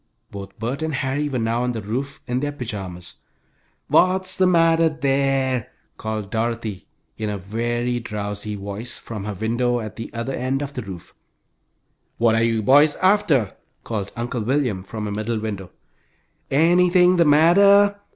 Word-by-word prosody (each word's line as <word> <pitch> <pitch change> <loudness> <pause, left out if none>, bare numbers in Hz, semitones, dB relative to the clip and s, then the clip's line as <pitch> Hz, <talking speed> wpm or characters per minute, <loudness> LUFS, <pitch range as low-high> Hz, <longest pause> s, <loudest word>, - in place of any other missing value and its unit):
Both 100 -1 -9
Bert 120 +7 -3
and 160 -2 -2
Harry 145 +2 -1
were 130 - -2
now 115 +1 0
on 125 0 -1
the 110 - -4
roof 130 +7 -4
in 125 +1 -1
their 145 +1 -2
pajamas. 100 -10 -7 0.7
"What's 185 +1 +2
the 185 - +3
matter 165 -2 +4
there?" 135 -4 0 0.3
called 110 -2 -4
Dorothy, 115 -4 -3 0.3
in 110 -1 -2
a 105 - -3
very 120 +5 -2
drowsy 105 -1 -5
voice, 100 +4 -6
from 105 -4 -7
her 105 -1 -4
window 120 +4 0
at 110 -2 -7
the 115 - -7
other 115 +3 -4
end 130 +3 -1
of 140 0 -6
the 130 - -4
roof. 95 -5 -10 1.0
"What 115 -1 +3
are 115 - +2
you 115 -1 +1
boys 145 +6 +5
after?" 175 - +2 0.3
called 105 -4 -4
Uncle 120 0 -3
William, 125 -4 0
from 105 +2 -6
a - - -4
middle 110 +3 -2
window. 100 -4 -5 0.8
"Anything 180 +4 +4
the 170 - +4
matter?" 200 +7 +5
120 Hz, 160 wpm, -22 LUFS, 110-145 Hz, 1.0 s, boys